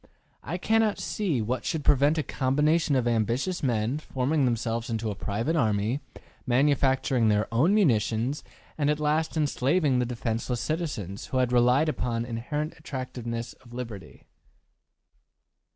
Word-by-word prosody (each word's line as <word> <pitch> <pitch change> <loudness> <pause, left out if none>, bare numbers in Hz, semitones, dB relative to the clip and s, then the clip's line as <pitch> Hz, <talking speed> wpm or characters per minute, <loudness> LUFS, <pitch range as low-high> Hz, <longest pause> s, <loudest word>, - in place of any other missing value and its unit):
I 165 +7 -4
cannot 220 +2 +2
see 165 - -1
what 125 +4 -2
should 155 -3 -2
prevent 145 +2 +4
a 155 - +1
combination 150 +4 +1
of 125 -2 +1
ambitious 120 - 0
men 120 +1 0
forming 140 0 0
themselves 115 -1 -1
into 110 -1 -2
a - - -5
private 110 - -2
army, 110 -1 +1 0.5
manufacturing 130 -2 +2
their 105 0 +2
own 160 - +4
munitions, 125 - +1 0.4
and 145 -1 +2
at 150 0 +1
last 155 +2 0
enslaving 145 -1 +2
the 125 - 0
defenseless 120 0 -2
citizens, 135 - -3
who 130 - -2
had 125 -1 +2
relied 125 +5 +4
upon 120 -6 -1
the 120 - -8
inherent 150 +7 -3
attractiveness 125 -5 -5
of 120 -2 -18
liberty. 115 -6 -8
130 Hz, 140 wpm, -27 LUFS, 115-150 Hz, 0.5 s, prevent